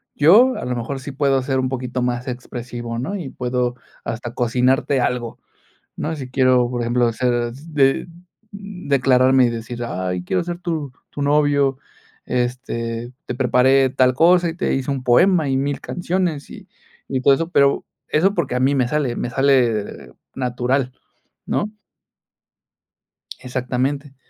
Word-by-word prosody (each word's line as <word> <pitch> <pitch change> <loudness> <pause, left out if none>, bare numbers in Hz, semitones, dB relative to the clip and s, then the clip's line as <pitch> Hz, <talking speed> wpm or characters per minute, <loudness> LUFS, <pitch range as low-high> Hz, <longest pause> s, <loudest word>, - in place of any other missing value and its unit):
yo, 220 - +6
a - - -5
lo 125 - -2
mejor, 120 +3 -4
sí 140 +2 -7
puedo 135 -1 +1
ser 130 +1 -1
un 130 - 0
poquito 125 -1 -3
más 125 +1 -2
expresivo, 120 -1 -6
¿no? 165 +11 -3
Y 165 -9 -5
puedo 125 -1 -2 0.3
hasta 120 +1 -5
cocinarte 125 +3 +1
algo, 120 -2 -2 0.6
¿no? 160 +1 -3
Si 130 -3 -7
quiero, 130 -2 +3
por 120 -1 -3
ejemplo, 120 0 +1
ser 120 0 0
de 140 0 0 0.4
declararme 135 -10 +2
y - - +2
decir: 115 +1 -5
"Ay, 90 -4 -3
quiero 180 - -1
ser 175 0 -5
tu 160 -6 -3 0.2
tu 145 - -7
novio, 145 -2 +2 0.5
este, 120 -1 -3
te - - -4
preparé 130 +1 +3
tal 130 0 +3
cosa, 170 +5 +4
y - - -4
te - - -1
hice 135 +1 -1
un 135 -2 -3
poema, 155 +5 +4
y 135 - +1
mil 140 +1 -1
canciones, 175 -4 -2
y - - -11 0.4
y 130 -1 -2
todo 140 - +5
eso". 165 +4 -1
Pero 140 -3 +3 0.2
eso, 190 +6 +2
porque 145 -7 -1
a - - +1
mí 135 +2 +2
me 125 -3 +2
sale 140 -4 -1
me 120 - -3
sale 120 - +1 0.2
natural, 125 +1 -1 0.6
¿no? 210 +1 -1 1.7
Exactamente. 130 +3 -3
130 Hz, 155 wpm, -20 LUFS, 125-145 Hz, 1.7 s, yo